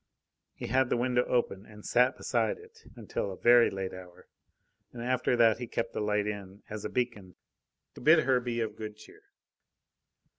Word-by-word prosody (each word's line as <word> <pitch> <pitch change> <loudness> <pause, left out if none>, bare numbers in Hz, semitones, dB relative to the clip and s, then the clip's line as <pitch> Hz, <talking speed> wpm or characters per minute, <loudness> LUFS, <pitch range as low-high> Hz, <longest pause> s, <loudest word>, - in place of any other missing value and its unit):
He - - -6
had 130 -1 +2
the - - +1
window 125 0 +2
open 105 -5 -1
and 105 -1 -13
sat 125 +2 +3
beside 115 -4 0
it - - -17
until 100 - -4
a 95 - -8
very 120 0 +6
late 95 -1 -4
hour; 90 -1 -12 0.6
and 120 -1 -7
after 125 0 +1
that 115 -1 +4
he 120 - -5
kept 115 0 -3
the - - -2
light 105 0 +1
in, 100 -1 -6
as 105 -1 -5
a - - -3
beacon, 120 -7 -3 0.6
to - - -12
bid 155 +4 +6
her 130 -2 +3
be 120 -1 -3
of 110 - -3
good 105 -1 -7
cheer. 110 - -16
115 Hz, 185 wpm, -30 LUFS, 105-125 Hz, 0.6 s, very